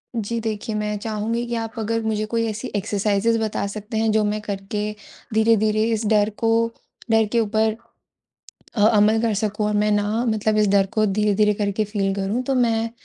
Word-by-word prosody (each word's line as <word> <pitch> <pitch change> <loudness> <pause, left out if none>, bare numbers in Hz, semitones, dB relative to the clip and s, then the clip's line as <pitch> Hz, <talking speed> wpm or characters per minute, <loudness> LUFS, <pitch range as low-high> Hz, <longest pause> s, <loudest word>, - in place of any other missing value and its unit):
जी 230 +1 -2
देखिए, 215 0 -3
मैं 210 0 -2
चाहूँगी 225 +2 -2
कि 235 - -2
आप 225 -1 -4
अगर 230 +1 -1
मुझे 215 -1 -1
कोई 230 +1 -1
ऐसी 220 +4 -5
एक्सरसाइज़िज़ 205 +2 +1
बता 215 -2 -2
सकते 215 +2 -6
हैं 220 0 +2
जो 215 0 +2
मैं 210 +1 -1
करके 205 +1 -4 0.4
धीरे-धीरे 220 -1 +3
इस 220 0 -2
डर 210 -1 +3
को 225 0 +1 0.6
डर 225 0 +4
के 235 - +2
ऊपर 220 0 +1 1.0
अ, 210 - -2
अमल 215 0 +4
कर 225 -2 +1
सकूँ 210 +1 -1
और 210 - -1
मैं 210 0 +2
ना 210 +3 0
मतलब 215 0 +1
इस 210 -1 +3
डर 195 -1 +3
को 215 -2 +3
धीरे-धीरे 210 +1 +2
करके 205 +1 -1
फील 200 -2 -1
करूँ 200 +5 -1
तो 270 +1 0
मैं 230 -2 +1
215 Hz, 190 wpm, -22 LUFS, 205-225 Hz, 1.0 s, डर